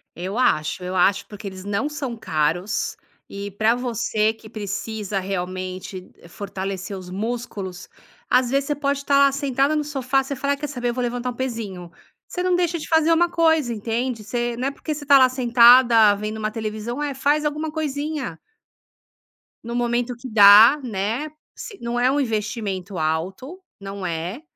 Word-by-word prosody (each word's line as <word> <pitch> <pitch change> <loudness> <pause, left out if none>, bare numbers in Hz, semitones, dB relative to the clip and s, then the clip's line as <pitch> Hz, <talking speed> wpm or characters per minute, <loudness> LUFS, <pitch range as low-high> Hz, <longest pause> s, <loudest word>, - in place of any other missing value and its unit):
Eu 185 +6 -5
acho, 180 -7 +1
eu 185 +1 -4
acho, 190 +2 +3
porque 205 -1 -9
eles 190 -1 -8
não 205 +9 -1
são 275 -5 -4
caros, 165 0 -1 0.3
e 200 +1 -6
pra 215 +4 +2
você 225 -3 0
que 220 0 -14
precisa 210 -1 -4
realmente 185 0 -5 0.2
fortalecer 195 0 -5
os 185 -1 -9
músculos. 205 -3 -5 0.4
Às 250 0 +3
vezes 275 0 +1
você 295 - -1
pode 280 -1 -1
tá 280 0 +3
lá 280 0 +5
sentada 275 +1 0
no 300 - 0
sofá, 270 -2 0
você 280 +1 -5
fala: 280 +2 0
"Ai, - - -4
quer 295 +1 -4
saber? 245 -3 -3
Eu - - -1
vou 250 - -3
levantar 245 +1 -2
1 - - -8
pezinho", 215 -9 -5 0.4
você 360 - -4
não 365 -1 +2
deixa 350 -1 0
de 305 - -7
fazer 320 0 +3
uma 345 +1 +4
coisa, 320 -7 +2
entende, 230 +1 -3
você 240 +2 -2
não 255 +3 -2
é - - -1
porque 305 +2 -5
você 295 0 -7
tá 280 0 +7
lá 260 -1 +7
sentada 235 -3 +6
vendo 215 +2 -5
uma 215 0 -2
televisão 220 +4 -4
é, 285 -2 -2
faz 290 +3 +1
alguma 300 +1 -2
coisinha. 295 - -3 1.3
No 235 +1 -6
momento 240 0 0
que 255 +1 -9
dá, 215 +5 +8
né. 230 +7 -2 0.3
Se 410 -4 -9
não 235 +1 -3
é 255 +2 +3
um 290 - +1
investimento 210 -5 -3
alto, 185 - -3 0.2
não 195 -1 -7
é. 175 - -4
235 Hz, 180 wpm, -22 LUFS, 200-275 Hz, 1.3 s, dá